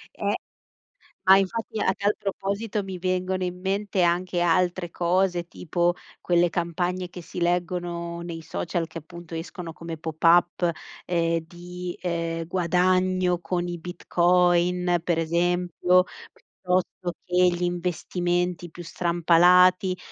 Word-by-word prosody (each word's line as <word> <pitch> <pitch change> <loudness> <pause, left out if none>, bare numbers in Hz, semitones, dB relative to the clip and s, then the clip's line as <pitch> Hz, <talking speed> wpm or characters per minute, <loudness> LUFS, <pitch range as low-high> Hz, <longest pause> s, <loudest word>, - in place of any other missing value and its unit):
Eh, - - -1 0.9
ma 190 +1 +8
infatti 215 +3 -2
a 190 - +2
tal 205 +2 0
proposito, 200 +1 -3
mi 190 -1 -6
vengono 185 0 -1
in 180 0 -4
mente 195 0 -1
anche 175 +1 +1
altre 175 0 +1
cose, 175 0 +1
tipo 175 +1 0 0.3
quelle 175 0 +3
campagne 175 +1 -2
che 180 0 -9
si 175 - -8
leggono 175 -1 -1
nei 170 -1 -6
social, 165 +1 -3
che 165 - -9
appunto 170 +1 -12
escono 165 0 -6
come 165 -1 -7
pop-up 170 +2 +3 0.4
ehm, 170 -1 +1
di, 175 +1 -8
ehm, 165 -2 -2
guadagno 185 +1 +1
con 175 0 -2
i 175 - -4
Bitcoin, 175 0 +2
per 170 -1 0
esempio, 175 +2 +2 0.3
piuttosto 180 -1 -3
che 180 - -5
gli 175 0 0
investimenti 175 0 -1
più 175 +2 -10
strampalati. 180 +2 +4
175 Hz, 120 wpm, -25 LUFS, 170-180 Hz, 0.9 s, ma